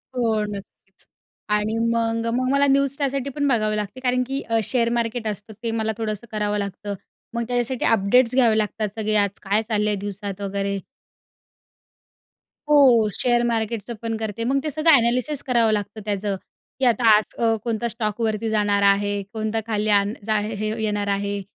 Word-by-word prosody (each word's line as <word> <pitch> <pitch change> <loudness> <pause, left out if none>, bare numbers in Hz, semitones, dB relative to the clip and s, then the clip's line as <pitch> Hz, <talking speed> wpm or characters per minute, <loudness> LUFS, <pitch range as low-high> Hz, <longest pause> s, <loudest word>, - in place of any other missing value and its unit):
हो 225 -3 +1
नक्कीच, 195 -1 -9 0.4
आणि 210 +1 0
मग, 230 0 0
मग 255 +1 0
मला 280 0 +3
न्यूज 275 0 +2
त्यासाठी 275 -1 -1
पण 285 -1 0
बघावे 215 -4 +1
लागते 210 +5 -4
कारण 250 0 +1
की 275 +1 -3
अ, 225 0 +2
शेअर 235 +1 +3
मार्केट 230 -1 -2
असतं 210 +1 -5
ते 230 - -1
मला 220 -1 -1
थोडंसं 215 0 -4
करावं 210 -1 -1
लागतं 200 +1 -5 0.4
मग 235 0 -1
त्याच्यासाठी 245 0 -1
अपडेट्स 230 +4 +3
घ्यावे 230 -4 +4
लागतात 215 0 -1
सगळे 215 0 0
आज 200 -1 +1
काय 205 +2 +1
चालल 210 -1 +1
आहे 210 - +1
दिवसात 200 0 -6
वगैरे. 200 0 -2 1.9
हो 255 -7 +6
शेअर 240 -1 +2
मार्केटचं 230 -1 -2
पण 225 -1 -2
करते 220 0 -4
मग 270 +3 +1
ते 305 - -1
सगळं 310 0 +5
एनालिसिस 250 +5 +1
करावं 235 -4 +2
लागतं 210 +1 -3
त्याचं 205 -1 -1 0.4
की 265 - +2
आता 235 -1 +4
आज 215 - -4
अ, 225 -1 +2
कोणता 235 0 -1
स्टॉक 220 -1 -3
वरती 220 0 -1
जाणार 205 -2 +1
आहे, 200 0 +2
कोणता 220 0 -1
खाली 215 -1 -1
आण 205 0 +3
जा 215 -1 +2
हे 215 0 -3
येणार 205 -1 -1
आहे. 200 0 -1
220 Hz, 175 wpm, -23 LUFS, 205-240 Hz, 1.9 s, हो